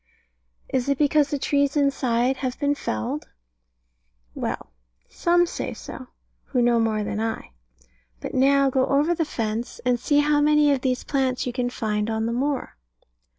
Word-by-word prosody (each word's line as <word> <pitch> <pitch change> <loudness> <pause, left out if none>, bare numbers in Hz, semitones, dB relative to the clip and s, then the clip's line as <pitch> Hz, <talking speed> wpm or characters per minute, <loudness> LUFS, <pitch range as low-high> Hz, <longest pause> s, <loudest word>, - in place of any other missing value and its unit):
Is 260 +1 -1
it 280 - +2
because 295 0 +3
the 290 - -1
trees 285 +1 +1
inside 265 -3 +1
have 260 -1 -3
been 285 0 +2
felled? 115 - -3 1.1
Well, - - -4 0.4
some 350 0 +2
say - - -5
so, 255 - -9 0.4
who 255 - -1
know 240 -1 +3
more 220 -2 +1
than 210 - -3
I. 225 - -3 0.7
But - - -6
now 275 +1 +4
go 260 0 +2
over 290 +5 +2
the 330 -1 -1
fence, 225 -3 -3
and 250 -1 +2
see 290 +4 +1
how 295 0 +2
many 300 0 +4
of 275 -2 +1
these 255 -1 -1
plants 265 -2 0
you 250 - -3
can 245 -1 -1
find 215 -3 -2
on 220 0 -1
the 230 - -1
moor. 275 - -2
260 Hz, 165 wpm, -24 LUFS, 235-285 Hz, 1.1 s, now